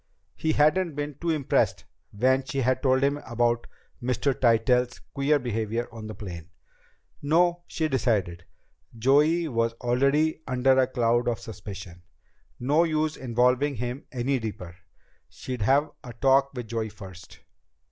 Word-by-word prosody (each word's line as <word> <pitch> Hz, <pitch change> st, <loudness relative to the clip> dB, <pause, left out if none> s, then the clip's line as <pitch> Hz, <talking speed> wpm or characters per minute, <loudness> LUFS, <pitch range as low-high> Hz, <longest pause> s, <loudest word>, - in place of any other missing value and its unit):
He 160 Hz, 0 st, 0 dB
hadn't 155 Hz, +2 st, +2 dB
been 145 Hz, 0 st, -3 dB
too 170 Hz, -, -1 dB
impressed 150 Hz, -5 st, +1 dB, 0.3 s
when 130 Hz, +5 st, +2 dB
she 135 Hz, 0 st, -3 dB
had 130 Hz, +1 st, +1 dB
told 130 Hz, -1 st, +2 dB
him 140 Hz, +1 st, +2 dB
about 120 Hz, -3 st, -1 dB, 0.3 s
Mr. 130 Hz, +3 st, 0 dB
Tytell's 125 Hz, +1 st, +2 dB
queer 140 Hz, +2 st, 0 dB
behavior 115 Hz, -2 st, -2 dB
on 110 Hz, -2 st, -8 dB
the 110 Hz, -, -7 dB
plane. 90 Hz, -4 st, -8 dB, 0.7 s
No, 175 Hz, +4 st, +2 dB
she 160 Hz, -1 st, -1 dB
decided. 105 Hz, -, 0 dB, 0.5 s
Joey 150 Hz, +8 st, +3 dB
was 115 Hz, -4 st, 0 dB
already 140 Hz, +7 st, +1 dB
under 130 Hz, +1 st, +3 dB
a 130 Hz, -, +3 dB
cloud 120 Hz, -2 st, +1 dB
of 120 Hz, -2 st, 0 dB
suspicion. 95 Hz, -6 st, -9 dB, 0.6 s
No 145 Hz, +7 st, +3 dB
use 155 Hz, -1 st, 0 dB
involving 125 Hz, +3 st, +1 dB
him 125 Hz, +3 st, -5 dB
any 130 Hz, +1 st, -1 dB
deeper. 95 Hz, -6 st, -6 dB, 0.5 s
She'd 125 Hz, -3 st, -7 dB
have 135 Hz, +7 st, +2 dB
a 120 Hz, -2 st, -9 dB
talk 135 Hz, +3 st, +3 dB
with 125 Hz, -2 st, -5 dB
Joey 110 Hz, -1 st, -2 dB
first. 95 Hz, -3 st, -12 dB
125 Hz, 140 wpm, -26 LUFS, 115-140 Hz, 0.7 s, Joey